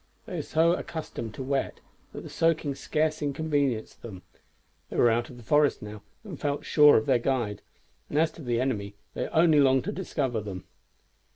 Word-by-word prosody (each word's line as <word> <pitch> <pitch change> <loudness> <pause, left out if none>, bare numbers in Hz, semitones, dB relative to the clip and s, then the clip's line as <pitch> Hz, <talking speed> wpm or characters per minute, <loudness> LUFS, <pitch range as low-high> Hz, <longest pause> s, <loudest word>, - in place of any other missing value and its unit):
They - - -6
were - - -1
so 165 +2 +2
accustomed 155 - -5
to 135 - -5
wet 135 +1 -2 0.3
that - - -8
the - - -9
soaking 160 -3 +1
scarce 155 +3 -1
inconvenienced 145 -5 -1
them. 95 -6 -9 0.7
They - - -6
were 120 - +5
out 120 +1 0
of 125 - -12
the 120 - -13
forest 145 +1 +2
now, 105 0 -8 0.2
and 185 -10 -9
felt 145 -1 -2
sure 150 -1 +6
of 145 - 0
their 130 -4 +3
guide; 120 -5 -1 0.5
and 145 - -2
as 160 +1 +3
to 170 - -13
the 120 -4 -1
enemy, 105 -6 -2 0.2
they - - -3
only 160 -2 +4
longed 135 -2 +4
to - - -3
discover 135 - -2
them. 95 -3 -7
135 Hz, 190 wpm, -27 LUFS, 120-155 Hz, 0.7 s, sure